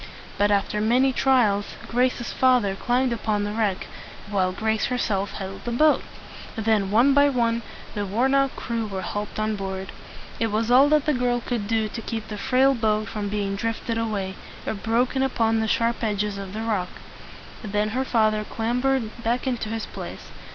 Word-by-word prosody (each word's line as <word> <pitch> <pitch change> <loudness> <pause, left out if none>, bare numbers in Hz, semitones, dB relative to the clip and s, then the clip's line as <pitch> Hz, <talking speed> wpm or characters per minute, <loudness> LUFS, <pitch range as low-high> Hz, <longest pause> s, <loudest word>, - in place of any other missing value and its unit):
But 205 0 +4
after 205 +1 +1
many 255 +5 +3
trials, 235 -7 +2
Grace's 245 0 0
father 250 -6 +3
climbed 245 +4 +1
upon 215 -2 -1
the 205 - -2
wreck, 210 -3 -1 0.5
while 185 -2 +1
Grace 220 +3 0
herself 205 -6 -1
held 195 0 -6
the 240 - -3
boat. 300 +6 +4 0.5
Then 215 -3 +1
one 240 +7 +5
by 285 +1 +5
one 235 -3 +1 0.3
the 205 - -2
worn 235 +7 +1
out 275 -1 +2
crew 230 -2 -3
were 190 -2 -4
helped 205 0 -4
on 215 0 0
board. 190 -1 -5 0.5
It 225 - +2
was 220 +2 0
all 270 +3 +7
that 300 -1 +3
the 305 - +2
girl 245 -1 +1
could 235 -4 -3
do 220 -1 +1
to 230 - -6
keep 225 0 -5
the 210 -1 -5
frail 265 +4 +3
boat 215 -3 0
from 205 -1 -3
being 200 -1 -1
drifted 230 +2 -2
away, 205 -4 -2 0.3
or - - -1
broken 230 +5 0
upon 225 -4 +1
the 220 - 0
sharp 230 +2 0
edges 210 -1 0
of 195 -1 -7
the 220 +1 -4
rock. 205 -5 -1 0.7
Then 210 0 0
her 255 +4 -1
father 215 -4 +2
clam 230 +3 -2
bered 265 -4 +1
back 240 +3 0
into 240 -4 -2
his 225 0 -3
place. - - -8
225 Hz, 185 wpm, -24 LUFS, 205-245 Hz, 0.7 s, all